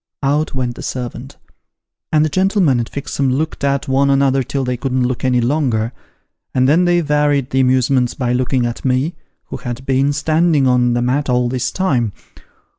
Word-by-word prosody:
Out 145 +2 0
went 125 -2 -2
the - - -10
servant; 125 +2 -6 0.7
and 155 0 +3
the - - -1
gentleman 185 - +2
and 115 - -3
Fixem 140 -1 -2
looked 155 +3 -2
at 140 +1 0
one 135 +1 +2
another 135 -1 +3
till 135 +2 -3
they 125 0 -1
couldn't 130 0 -1
look 125 -1 -3
any 125 -1 +2
longer, 120 -3 0 0.6
and 130 0 +3
then 165 +6 +4
they 175 0 +3
varied 145 -3 +1
the 130 - +1
amusements 130 -1 +2
by 125 -2 -1
looking 125 0 0
at 120 0 -4
me, 130 +5 0 0.4
who - - -5
had 120 0 -6
been 135 +1 +2
standing 155 0 +2
on 125 -1 +3
the 120 0 0
mat 135 +3 0
all 125 -1 +2
this 125 0 -1
time. 125 - 0
130 Hz, 185 wpm, -17 LUFS, 125-145 Hz, 0.7 s, then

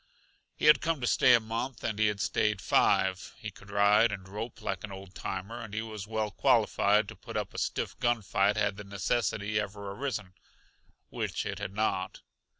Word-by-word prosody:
He - - -3
had 150 -2 +7
come 165 -2 0
to - - -1
stay 125 +1 +6
a - - +4
month, 115 +3 -4
and 110 -2 -2
he 110 - +4
had 105 -1 -1
stayed 105 0 +1
five. 95 0 +2
He 110 -2 -6
could 100 +1 -16
ride 105 +2 +4
and 95 -3 -6
rope 110 +4 -6
like 100 -5 -3
an 105 - -6
old 95 -1 -9
timer, 95 +5 -5
and 110 -2 -8
he 110 - -1
was 110 -2 -7
well 110 -1 -2
qualified 105 +2 +3
to - - -8
put - - -7
up - - -3
a - - -4
stiff - - -2
gun 120 -2 +1
fight 100 +2 +2
had 100 -1 +1
the 105 - -7
necessity 100 +1 -1
ever 100 -1 -5
arisen 105 -5 -4 0.8
which - - -3
it - - -4
had 95 - -5
not. 95 -3 -1
105 Hz, 200 wpm, -30 LUFS, 100-110 Hz, 0.8 s, had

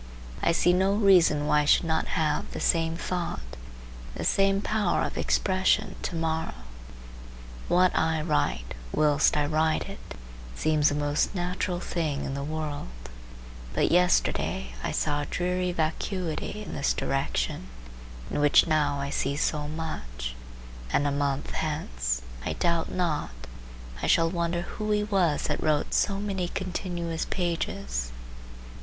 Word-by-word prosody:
I - - +3
see 175 +1 +3
no 190 +2 +3
reason 180 -8 +5
why 150 0 +4
I - - -1
should 150 - +5
not 160 -1 0
have 155 -2 0
the - - -4
same 165 -1 +2
thought, 170 - -4 0.6
the - - -4
same 195 0 +3
power 210 -2 +1
of - - -3
expression, 185 -1 +1
to 175 - -3
morrow. 160 - -1 1.1
What 180 +1 +4
I 160 -1 +1
write, 70 - 0 0.2
whilst 150 0 +3
I 145 - +2
write 155 +1 +1
it, - - -9 0.4
seems 155 - +3
the 145 - -1
most 145 +5 0
natural 180 0 -1
thing 155 -6 -2
in 135 - -3
the 140 0 -3
world; 155 - -4 0.9
but - - +2
yesterday 170 - +2
I - - -1
saw 145 -1 0
a 145 - -4
dreary 180 0 -1
vacuity 175 +4 -2
in - - -7
this 140 - 0
direction 135 - -1 0.6
in - - -1
which 145 0 +6
now 150 -3 +1
I 140 0 -3
see 140 0 0
so 150 0 0
much; 65 - -5 0.6
and 145 - +2
a 145 - +2
month 140 -1 -1
hence, 60 - -2 0.2
I 80 - -2
doubt 170 - 0
not, 170 -5 -1 0.7
I - - -1
shall 165 0 +4
wonder 170 0 -1
who 215 +4 -5
he 210 0 +2
was 190 -7 +1
that - - -1
wrote 150 -2 +1
so 195 - +2
many 195 -3 -2
continuous 175 -3 -3
pages. 65 - -2
160 Hz, 145 wpm, -27 LUFS, 145-180 Hz, 1.1 s, which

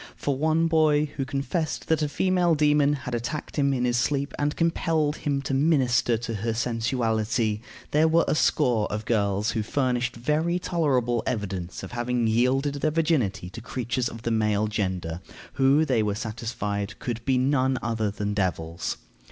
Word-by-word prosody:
For 140 - -1
one 160 +4 +2
boy 155 -2 +3
who 135 - -2
confessed 145 +4 -2
that 160 -1 +2
a 150 - 0
female 180 0 +2
demon 150 -1 +3
had 125 - -4
attacked 120 +6 -4
him 140 -1 +3
in 125 -2 0
his 120 -1 +1
sleep, 140 +3 0
and 145 0 0
compelled 165 -2 +1
him 140 -2 -1
to 135 - -3
minister 130 -5 +3
to 115 0 -5
her 115 0 -1
sensuality, 115 -2 0 0.3
there 155 +2 +4
were 165 +1 +3
a - - +2
score 125 -8 +2
of 105 +1 -3
girls 105 -1 +1
who 110 - -1
furnished 125 +1 -1
very 155 +8 0
tolerable 130 -10 +1
evidence 95 -7 -3
of - - -7
having 120 0 -1
yielded 125 +5 +2
their 155 - +2
virginity 150 - 0
to 115 - -8
creatures 120 +1 -2
of 115 +1 -10
the 115 - -1
male 105 -1 +1
gender, 95 -5 -2 0.3
who, 140 +3 +4
they 130 -6 +2
were 105 -1 0
satisfied, 105 -2 -4
could 115 -2 -4
be 130 0 +2
none 130 0 +2
other 110 -2 0
than 105 0 -3
devils. 85 -4 -2
125 Hz, 170 wpm, -26 LUFS, 110-145 Hz, 0.3 s, there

